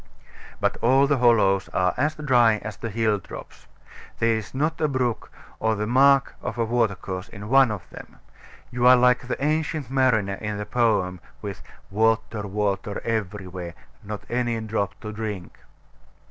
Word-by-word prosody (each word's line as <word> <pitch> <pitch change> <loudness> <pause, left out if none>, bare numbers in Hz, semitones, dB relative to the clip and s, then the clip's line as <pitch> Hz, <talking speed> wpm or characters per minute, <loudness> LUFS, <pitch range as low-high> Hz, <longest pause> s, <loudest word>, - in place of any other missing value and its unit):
But - - 0
all 135 +4 +4
the 140 -1 +1
hollows 105 -6 +3
are 90 -1 +2
as 150 +4 0
dry 125 -7 +3
as 110 -1 -6
the 115 - -5
hill 110 -1 +1
tops. - - -11 0.5
There 115 0 +2
is 110 -2 -5
not 155 +4 -1
a 155 - +3
brook, 130 -4 -2 0.3
or 110 0 +1
the 105 +1 -2
mark 135 +3 +4
of 120 -1 -5
a 115 - +1
watercourse, 100 -5 -1
in 105 0 -9
one 135 -1 +6
of 105 -5 -5
them. - - -11 0.6
You 125 0 +2
are 130 - +9
like 125 0 +3
the - - -2
Ancient 155 -3 -1
Mariner 110 -8 +2
in 105 -1 -3
the 105 - -4
poem, 105 -6 +1 0.2
with 100 -4 -6 0.3
"Water, 110 0 +1
water, 100 0 -2
every 105 -3 -2
where, 90 -2 -7 0.3
Nor 105 0 -6
any 120 -1 -1
drop 110 -2 -3
to 110 - -6
drink." 105 -5 -6
110 Hz, 165 wpm, -24 LUFS, 100-125 Hz, 0.6 s, are